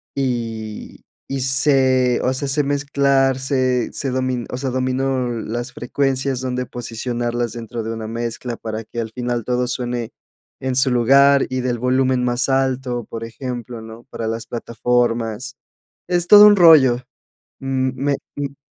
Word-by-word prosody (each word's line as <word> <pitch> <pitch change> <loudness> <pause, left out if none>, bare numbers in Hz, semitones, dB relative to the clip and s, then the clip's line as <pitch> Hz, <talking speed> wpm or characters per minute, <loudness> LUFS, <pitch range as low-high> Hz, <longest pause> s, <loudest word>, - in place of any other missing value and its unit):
y 115 -5 -4 0.3
y 135 - -3
sé 130 -2 +3
o 125 - +2
sea, 140 +2 -2
sé 145 +2 +1
mezclar 140 -1 +1
sé 130 -2 0
sé 135 - -3
domi 130 -2 -1
o - - -3
sea, 135 0 -2
domino 130 0 -1
las 120 +1 -4
frecuencias 135 +1 -1
dónde 125 0 -3
posicionarlas 120 0 -3
dentro 120 0 -6
de 110 - -4
una 110 -1 -5
mezcla 115 +1 -4
para 110 0 -5
que 120 +2 -5
al 110 -1 -6
final 120 -1 -3
todo 125 +2 -1
suene 120 -2 -3 0.5
en 130 -1 -2
su 130 0 +3
lugar 135 +3 +5
y 130 0 -2
del 125 -1 -1
volumen 130 +1 +1
más 120 +1 +1
alto, 130 -2 0
por 115 +1 -7
ejemplo, 120 -1 -6
¿no?, 110 +1 -11
para 115 -4 -5
las 115 0 -3
plataformas, 120 +1 -1 0.5
es 175 -1 +2
todo 210 +2 +10
un 205 - +7
rollo, 155 -9 +6 0.6
m 130 -1 -1
me 140 +1 0 0.2
m 140 -1 -4
125 Hz, 155 wpm, -20 LUFS, 120-135 Hz, 0.6 s, todo